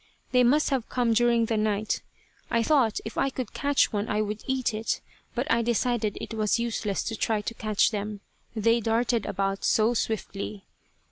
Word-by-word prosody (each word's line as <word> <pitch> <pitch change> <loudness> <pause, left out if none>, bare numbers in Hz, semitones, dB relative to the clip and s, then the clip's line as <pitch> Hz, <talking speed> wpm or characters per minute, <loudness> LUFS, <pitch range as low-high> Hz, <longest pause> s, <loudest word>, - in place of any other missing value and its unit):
They 250 -1 +5
must 290 +5 +3
have 260 -4 -1
come 240 -2 +1
during 235 0 +3
the 225 0 0
night. 215 0 0 0.5
I 230 0 +2
thought 255 -6 +3
if 220 - -4
I 270 - +2
could 255 -4 -5
catch 285 -3 +2
one 205 +1 -1
I 210 - 0
would 215 0 -2
eat 260 -3 0
it, 220 +1 -1 0.4
but 245 +2 0
I 230 0 +4
decided 235 -2 0
it - - -6
was 215 0 +1
useless 225 -4 -1
to 225 - -3
try 215 0 0
to 220 - -4
catch 215 -1 +1
them, 210 -1 -4 0.3
they 230 +2 +3
darted 230 0 +1
about 195 0 -1
so 220 +2 +3
swiftly. 210 -3 -3
225 Hz, 185 wpm, -27 LUFS, 210-240 Hz, 0.5 s, They